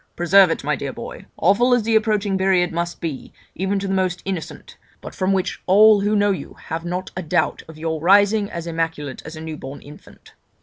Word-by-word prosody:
Preserve 180 +2 +5
it, 165 - -2
my 150 +1 0
dear 135 0 -5
boy, - - -9
awful 235 +9 +3
as 240 - 0
the 225 +1 +1
approaching 210 -2 +1
period 190 -2 +2
must 170 +1 -3
be, 155 -5 -5 0.2
even 190 +2 -1
to 195 0 -3
the 195 - -1
most 185 -2 -1
innocent, 185 -5 -6 0.2
but - - -10
from 185 +1 -1
which 190 -2 -1
all 210 +2 +6
who 205 +1 +1
know 205 0 +3
you 190 - -5
have 165 +1 -3
not 180 +2 -4
a 185 - -3
doubt 165 -1 0
of 160 -1 -12
your 160 -1 -3
rising 200 +3 +4
as 170 -1 -6
immaculate 165 -4 -3
as 160 - -8
a 155 - -8
new 160 -1 -6
born 135 +1 -8
infant. 150 +1 -16
180 Hz, 215 wpm, -21 LUFS, 160-200 Hz, 0.2 s, all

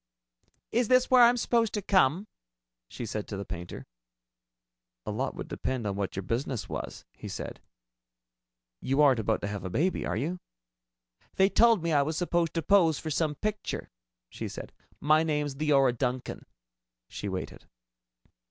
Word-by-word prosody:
"Is 240 0 +2
this 255 +1 +3
where 255 -1 +7
I'm 240 +1 +6
supposed 230 -2 +1
to 210 - -1
come?" 185 -2 +3 0.6
she 120 - -6
said 110 -1 -4
to 100 - -5
the 100 - -5
painter. 85 -2 -7 1.2
"A - - -3
lot - - -2
would - - -6
depend 130 -4 -3
on 100 -2 -1
what 100 -1 -3
your 95 - -3
business 120 +3 -2
was," - - -6
he - - -9
said. - - -6 1.2
"You 135 +3 +2
aren't 135 -5 +5
about 110 - 0
to - - -2
have 100 0 -5
a 95 - -4
baby, 170 - 0
are - - -2
you?" 165 +9 -2 1.0
"They 190 0 +4
told 230 -4 +4
me 165 -1 0
I 145 - +5
was 155 +2 -2
supposed 175 -2 0
to 165 - 0
pose 170 -6 +4
for 160 - -5
some 150 0 0
picture," 210 +5 -4 0.4
she - - -6
said. - - -8 0.3
"My 155 +2 +4
name's 150 -3 -1
Leora 135 -3 +3
Duncan." 125 +1 -3 0.6
She 100 - -5
waited. 95 -1 -6
150 Hz, 165 wpm, -28 LUFS, 120-185 Hz, 1.2 s, where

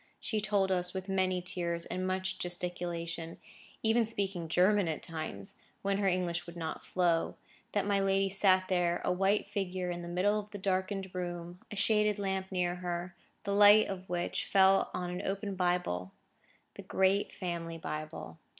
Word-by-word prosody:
She 215 -2 -1
told 200 -2 +1
us, 180 0 +1
with 190 +1 -4
many 185 -2 +1
tears, 170 -1 0
and 185 0 -3
much 185 0 -1
gesticulation, 175 -2 -4 0.5
even 225 +1 +4
speaking 195 -6 -2
German 185 +3 +3
at 160 - -3
times, 155 - -5 0.3
when 200 0 +1
her 200 - +2
English 175 -2 0
would 170 0 -9
not 160 -2 -4
flow, 175 -3 +1 0.4
that 205 - +1
my 200 -1 +2
lady 195 0 +2
sat 190 -1 +3
there, 175 -2 +1
a - - +2
white 195 +3 +2
figure 185 -3 -2
in 175 0 -4
the 170 - -7
middle 190 +5 +2
of 210 0 -8
the 205 - -7
darkened 190 0 -1
room; 175 -1 -5
a - - -6
shaded 210 0 +3
lamp 190 -1 -2
near 180 -1 0
her, 175 0 -4 0.3
the 200 - -1
light 205 +1 +7
of 190 -2 -6
which 175 0 -1
fell 195 0 +5
on 180 -1 -3
an 180 - -3
open 200 +1 -3
Bible,—the 175 - -4
great 190 +1 +2
family 170 -2 -4
Bible. 155 - -6
185 Hz, 170 wpm, -32 LUFS, 175-195 Hz, 0.5 s, light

